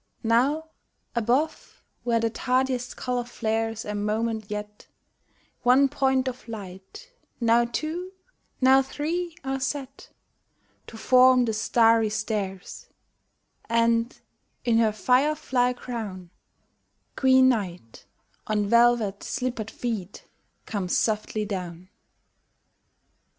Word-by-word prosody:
Now 270 +8 +2 0.5
above 250 +7 -1 0.2
where 235 -1 +1
the 230 0 0
tardiest 255 +1 -1
color 250 -1 -2
flares 225 -1 -2
a 210 - -4
moment 215 +1 -2
yet, 210 0 -7 0.7
One 260 +3 +5
point 265 -2 +1
of 255 -1 -6
light, 215 - -10 0.3
now 235 0 +3
two, 315 +9 -4 0.5
now 265 +1 +6
three 325 +5 -4
are 270 0 -2
set 270 0 -5 0.8
To 225 - -10
form 255 +2 +5
the 225 - -1
starry 225 0 +3
stairs,— 210 -3 -4 0.8
And, 230 +1 +1 0.5
in 230 -2 +3
her 220 -2 +3
fire 255 +7 +2
fly 250 -4 +1
crown, 215 -8 -7 0.8
Queen 260 0 +5
Night, 180 - -4 0.4
on 210 -1 0
velvet 235 -2 +3
slippered 240 -4 -3
feet, 215 -7 -5 0.4
comes 195 -4 -1
softly 215 -1 -1
down. 180 -3 -6
235 Hz, 105 wpm, -25 LUFS, 215-260 Hz, 0.8 s, now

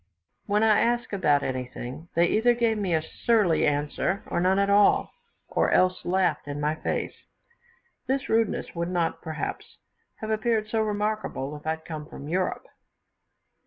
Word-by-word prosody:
When 210 +1 +2
I 215 -2 +5
asked 240 -1 0
about 150 -8 +2
anything, 130 +3 -5
they 170 +1 +5
either 235 +6 +3
gave 230 -2 +2
me 185 -5 0
a 155 - 0
surly 210 -2 +2
answer, 150 +6 -1
or - - -2
none 185 +2 +3
at 200 0 +3
all, 205 0 +4 0.3
or - - +1
else 185 0 +2
laughed 185 -3 +1
in 145 0 -4
my 150 +1 +1
face. 160 - -4 0.8
This 265 0 -1
rudeness 225 -1 0
would 170 0 -2
not, 175 -2 -1
perhaps, 160 -2 -5 0.4
have 220 0 -5
appeared 220 0 +1
so 225 +1 -1
remarkable 210 -9 -2
if 150 +1 -10
I 160 - +1
had 160 0 -21
come 155 -2 -6
from 145 - -9
Europe. 185 - -1
185 Hz, 160 wpm, -26 LUFS, 155-215 Hz, 0.8 s, I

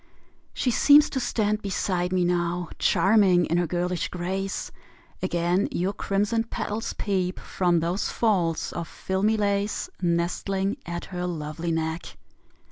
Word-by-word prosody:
She 250 - 0
seems 290 +5 +6
to 265 - -1
stand 215 -3 0
beside 180 -2 -1
me 180 -1 +2
now, 175 0 0
Charming 190 -4 +4
in 170 - 0
her 175 -1 +1
girlish 180 +1 -1
grace; 190 +2 -3 0.5
Again 175 +1 +1
your 185 +3 -1
crimson 210 +3 0
petals 220 -1 -3
peep 185 -3 -1
From 175 -3 +1
those 175 +4 -1
folds 180 -8 0
of 170 -1 -4
filmy 200 +6 0
lace 200 0 -1
Nestling 190 +5 0
at 175 0 -4
her 180 -1 -4
lovely 165 0 -3
neck. 160 +1 -3
180 Hz, 130 wpm, -26 LUFS, 175-200 Hz, 0.5 s, seems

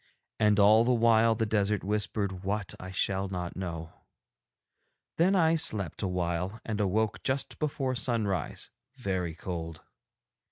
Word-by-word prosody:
And 105 -2 +4
all 105 +3 +7
the 125 +1 +3
while 115 -1 +4
the 115 0 0
desert 105 -1 0
whispered 100 -1 -1
what 100 0 -2
I 90 - -7
shall 95 +1 0
not 90 -2 -4
know. 85 -3 -5 1.2
Then 185 +4 +4
I 165 -3 +4
slept 105 - 0
awhile 90 +2 -2
and 110 -2 -2
awoke 105 +2 0
just 130 +1 -2
before 140 -4 -1
sunrise, 110 -8 -1 0.2
very 95 -9 -2
cold. 85 -2 -6
100 Hz, 130 wpm, -29 LUFS, 90-115 Hz, 1.2 s, all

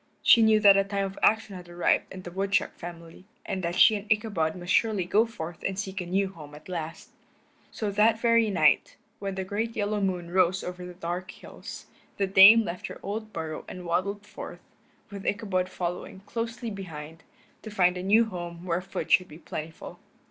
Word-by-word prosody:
She 230 - +7
knew 220 -1 +5
that 200 -2 +8
a 195 - +4
time 200 0 -2
of 195 0 -7
action 220 -2 +2
had 180 -1 -10
arrived 175 0 +1
in 185 -1 -8
the 175 - -8
woodchuck 195 +2 0
family, 170 +1 -10 0.2
and 190 - -3
that 170 +1 -2
she 215 - +6
and 205 +1 -6
Ichabod 205 -8 +1
must 175 0 -3
surely 215 -5 +2
go 215 +6 +3
forth 175 -6 -8
and 190 -1 -2
seek 195 -1 -4
a 175 - -6
new 195 +2 +1
home 150 -5 -12
at 150 - -14
last. 165 -3 -6 0.6
So 210 -2 -3
that 215 +2 +3
very 230 -1 +3
night, 160 -6 +3 0.2
when 195 -1 -4
the 190 - -3
great 220 +4 -3
yellow 210 0 -1
moon 180 -3 -2
rose 185 0 +2
over 180 0 -6
the 180 - -10
dark 180 +1 -4
hills, - - -10 0.3
the 200 - +1
Dame 195 +4 +8
left 175 -2 -5
her - - -9
old 215 +2 -5
burrow 160 -4 -5
and 180 -1 -8
waddled 200 +4 -1
forth, 210 - -9 0.5
with 200 -1 -7
Ichabod 195 -3 -1
following 180 +1 -5
closely 230 +2 -4
behind, 165 -5 -8 0.4
to 220 - -8
find 180 -3 +2
a 180 - -4
new 215 +5 +4
home 175 -4 -7
where 175 0 0
food 185 - -6
should 185 - +5
be 155 - -12
plentiful. 160 -1 -8
190 Hz, 200 wpm, -27 LUFS, 175-205 Hz, 0.6 s, that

